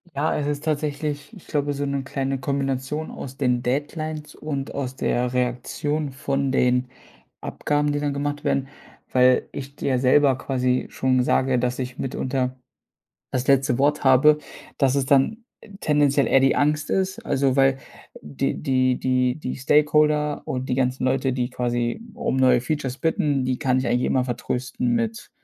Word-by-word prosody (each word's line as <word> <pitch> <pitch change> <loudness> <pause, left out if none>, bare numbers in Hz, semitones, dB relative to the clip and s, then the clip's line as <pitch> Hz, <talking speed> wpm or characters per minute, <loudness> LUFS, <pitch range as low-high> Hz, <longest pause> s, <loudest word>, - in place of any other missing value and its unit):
Ja, 150 +3 +1
es 145 - -2
ist 145 0 -2
tatsächlich 150 +1 -3
ich 190 - -15
glaube, 145 -1 -1
so 145 0 -3
'ne 140 -1 -1
kleine 135 0 -2
Kombination 135 +2 -2
aus 135 -1 -8
den 125 -3 +1
Deadlines 150 +3 -3
und 140 -3 -5
aus 130 -2 -4
der 125 -2 -1
Reaktion 130 +4 -2
von 135 0 -1
den 125 -1 +2 0.6
Abgaben, 145 0 -1
die 145 - -1
dann 145 -1 -1
gemacht 145 +1 -3
werden, 135 0 0 0.4
weil 125 0 +4
ich 140 +1 -8
dir 130 -3 0
selber 130 +1 +4
quasi 130 -2 0
schon 130 -1 +1
sage, 130 0 +2
dass 125 +1 -1
ich 125 -1 -5
mitunter 130 0 -2 0.8
das 130 0 -2
letzte 135 -2 +3
Wort 145 +3 +1
habe, 135 +3 +6 0.4
dass 135 -2 +3
es 140 -1 +1
dann 140 - +2 0.4
tendenziell 145 -2 +2
eher 135 - +4
die 135 0 +3
Angst 150 0 +1
ist. 190 +2 0
Also, 135 -6 +1
weil 135 0 +4 0.5
die 75 -2 -2
die 130 -3 +2
die 125 -1 +1
die 130 - -4
Stakeholder 150 +1 +2
und 130 0 -3
die - - +2
ganzen 130 0 0
Leute, 130 0 +1
die 125 0 -1
quasi 120 - -1
um 235 - -2
neue 125 -2 +4
Features 130 -2 -2
bitten, 145 -3 0
die 130 0 -1
kann 130 -3 +1
ich 130 - -1
eigentlich 120 +1 +1
immer 130 -1 +1
vertrösten 130 - -2
mit 230 -1 -2
135 Hz, 165 wpm, -23 LUFS, 130-145 Hz, 0.8 s, habe